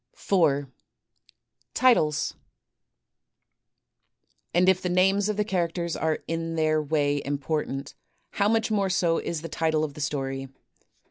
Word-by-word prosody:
4, 145 -7 +1 1.1
Titles 155 -13 +3 2.2
And 180 +1 +3
if 185 -1 +4
the 180 - -2
names 195 +3 +3
of 210 - -1
the 210 - +2
characters 170 -3 -1
are 160 -1 -1
in 165 0 -3
their 155 -1 +2
way 145 -1 +1
im 145 0 -2
portant, 140 -2 -3 0.4
how 200 0 +1
much 225 0 +1
more 200 -2 +1
so 175 -3 +2
is 165 -2 -4
the - - -4
title 160 -1 0
of 150 -2 -3
the 150 - -8
story. 135 -2 -3
165 Hz, 135 wpm, -26 LUFS, 150-185 Hz, 2.2 s, if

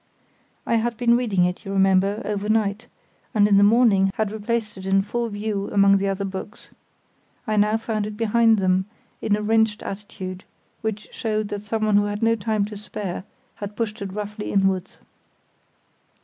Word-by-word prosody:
I 230 - +2
had 230 0 -1
been 235 0 +4
reading 210 -7 +2
it, 180 0 -3
you 195 - -6
remember, 195 +2 +2
overnight, 210 +1 0 0.5
and 205 -1 +5
in 200 -1 +4
the 200 - +6
morning 205 -3 +5
had 215 -2 -1
replaced 220 0 -2
it 190 0 -8
in 195 0 +3
full 235 +3 -2
view 205 -1 -3
among 200 0 +5
the 200 - 0
other 195 0 -1
books. 190 +2 -7 0.7
I 215 - -1
now 210 +1 +3
found 220 -2 -2
it 210 -1 -7
behind 225 0 +4
them, 185 -1 +2 0.4
in 205 - +2
a 210 - -3
wrenched 220 0 +2
attitude, 195 -2 -7 0.4
which 215 -1 -4
showed 215 -2 -2
that 205 - -4
someone 215 0 +1
who 205 - +3
had 205 +1 -3
no 225 0 +4
time 215 -1 0
to 210 +1 -8
spare 200 -3 -6 0.3
had 205 0 -6
pushed 220 -1 -3
it 195 -1 -4
roughly 210 +1 -5
inwards. 195 -2 0
210 Hz, 175 wpm, -23 LUFS, 195-220 Hz, 0.7 s, the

